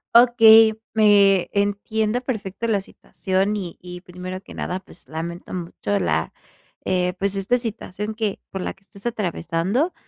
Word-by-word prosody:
Okey, 225 -2 +8 0.2
me 200 -3 +5
entiendo 210 +3 0
perfecto 220 -3 -4
la 205 -3 +1
situación. 195 +1 -2
Y 180 -4 -5
y 180 0 -9
primero 185 +1 -7
que - - -13
nada, 180 +1 -3
pues, 185 - -18
lamento 170 +3 -6
mucho 165 - -2
la, 80 -2 0 0.5
eh, 180 -1 0
pues, 200 0 0
esta 205 +6 +1
situación 215 -2 -5
que 215 -3 -2
por 190 - -5
la - - -3
que 195 - -30
estás 200 +1 -14
atravesando. 205 - -1
195 Hz, 150 wpm, -22 LUFS, 180-220 Hz, 0.5 s, Okey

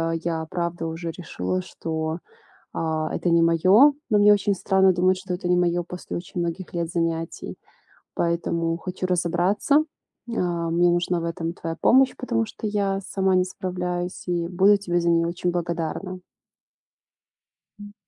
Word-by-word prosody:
э, - - -2
я 165 -1 -2
правда 170 -1 -2
уже 165 +1 -4
решила, 95 - -3
что, 160 - -4 0.6
а, 155 -1 -2
это 175 - -1
не 170 0 +5
моё, 185 - +6 0.2
но 210 -2 +4
мне 205 0 +7
очень 200 0 +1
странно 190 0 +3
думать, 185 +1 +2
что 185 -1 -5
это 180 0 -3
не 180 - +4
моё 175 0 +1
после 180 +1 -7
очень 175 +1 -6
многих 170 +2 -4
лет 170 -1 -2
занятий. 165 -1 -3 0.6
Поэтому 170 -1 0
хочу 185 +1 -4
разобраться. 180 - +2 0.5
А, 175 -6 -1
мне 175 +1 +3
нужна 175 0 +1
в - - -3
этом 165 0 -3
твоя 165 -1 -5
помощь, 265 +1 +5
потому 230 -3 -1
что 215 0 -6
я 200 -2 0
сама 190 0 0
не 185 - +4
справляюсь 180 -1 -4
и 170 -1 -1
буду 195 +3 +4
тебе 175 -3 -1
за 170 - +1
неё 170 0 +3
очень 175 +1 -2
благодарна. 170 +2 -3 1.6
М. 205 0 -10
175 Hz, 160 wpm, -24 LUFS, 170-190 Hz, 1.6 s, мне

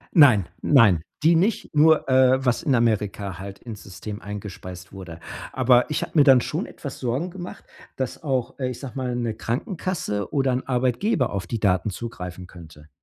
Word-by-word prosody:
Nein, 130 - +7 0.2
nein, 105 - +5 0.2
die 165 +1 +5
nicht 190 +1 0
nur, 155 0 +4
äh 130 0 +4
was 125 -1 +2
in 140 - +2
Amerika 105 -5 0
halt 100 +1 -8
ins 110 -4 -9
System 100 +4 -8
eingespeist 95 -3 -8
wurde. 90 -4 -9 0.3
Aber 125 -1 +3
ich 150 - -1
habe - - -7
mir 150 - +7
dann 135 -3 +7
schon - - -3
etwas - - -8
Sorgen 130 +9 -2
gemacht, 180 0 -9 0.3
dass 130 -2 -4
auch, 130 -2 -2
äh 130 - -1
ich 125 - -6
sage 135 -4 -8
mal, 130 -2 -2
'ne 120 -2 -2
Krankenkasse 115 - -3
oder 135 -3 +1
'n 125 +1 -2
Arbeitgeber 130 - +1
auf 95 -3 -4
die 115 - -3
Daten 95 -1 +1
zugreifen 90 -4 -7
könnte. 80 -4 -14
120 Hz, 180 wpm, -24 LUFS, 100-135 Hz, 0.3 s, Nein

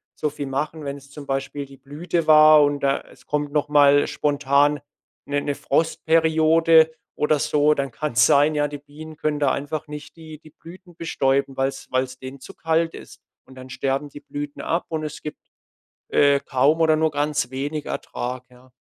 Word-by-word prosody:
so 150 - -2
viel 145 -1 -6
machen, 150 +3 -3
wenn 140 0 -4
es 140 0 -17
zum 145 -1 -11
Beispiel 135 +1 -3
die 135 0 -15
Blüte 155 +5 -3
war 155 -1 +7
und 145 0 0
da 140 0 0
es - - -20
kommt 145 -1 -2
noch 150 -1 0
mal 145 -1 +5
spontan 145 0 +1 0.5
'ne 145 0 -1
'ne 145 - -2
Frostperiode 160 0 +3 0.2
oder 150 0 +1
so, 150 +1 +2
dann 140 -2 -3
kann's 120 -3 +1
sein, 145 +4 +4
ja, 145 0 +1
die 145 0 -8
Bienen 150 +2 -12
können 150 -2 -1
da 140 -2 +2
einfach 145 +3 -4
nicht 150 +1 -9
die 155 -2 -11
die 155 - -17
Blüten 175 +3 -15
bestäuben, 135 -5 -1
weil's 135 0 -2
weil's 130 0 -1
denen 130 +1 -9
zu 195 - -12
kalt 165 0 0
ist. - - -13 0.2
Und 130 - -16
dann 130 0 -11
sterben 135 +3 -2
die 145 - -12
Blüten 145 0 -7
ab 170 +2 -2
und 160 -1 -4
es 155 - -6
gibt, 150 - -7 0.7
äh, 140 -1 +4
kaum 140 +3 +1
oder 160 -1 +4
nur 155 0 +1
ganz 145 -3 -1
wenig 145 +3 -4
Ertrag, 125 +1 -5
ja. 125 +1 -21
145 Hz, 190 wpm, -22 LUFS, 140-155 Hz, 0.7 s, war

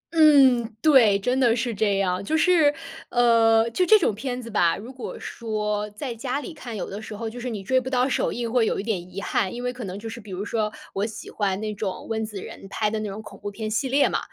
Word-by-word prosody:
嗯， 265 -7 +6
对， 240 -9 +6
真 250 +6 0
的 240 -3 +4
是 235 -1 -1
这 200 -1 +1
样。 185 0 0
就 315 +10 0
是， 320 -4 +5 0.4
呃， 230 -2 +4
就 365 - +1
这 430 +4 +7
种 325 - +1
片 250 +3 -4
子 230 -2 -8
吧， 175 -5 +2
如 235 +6 -9
果 255 - -7
说 210 -2 -3
在 240 +3 -5
家 250 +4 -3
里 325 - -7
看， 235 -7 -7
有 - - -4
的 205 +2 -6
时 215 -1 -8
候 225 +1 -4
就 240 +2 -7
是 250 +1 -4
你 205 -4 -5
追 260 +4 +2
不 260 - -5
到 255 0 +2
首 - - 0
映 235 -1 -3
会 235 -3 +3
有 - - -1
一 - - -3
点 185 -5 -3
遗 195 - -5
憾， 195 -1 0
因 245 - -5
为 250 0 -2
可 245 -1 -7
能 190 +1 -6
就 225 +2 -7
是 225 +1 -7
比 205 - -14
如 190 +2 -4
说 215 -1 -1 0.2
我 195 - -1
喜 220 - -9
欢 200 -2 -1
那 215 -1 -3
种 200 -2 -5
温 220 0 -1
子 210 -3 -6
仁 195 - -10
拍 210 +1 -1
的 220 - -1
那 215 -1 -3
种 210 +3 -7
恐 - - -12
怖 205 - -5
片 215 +1 -5
系 255 +4 0
列 280 +2 +4
嘛， - - 0
225 Hz, 285 characters per minute, -24 LUFS, 205-250 Hz, 0.4 s, 这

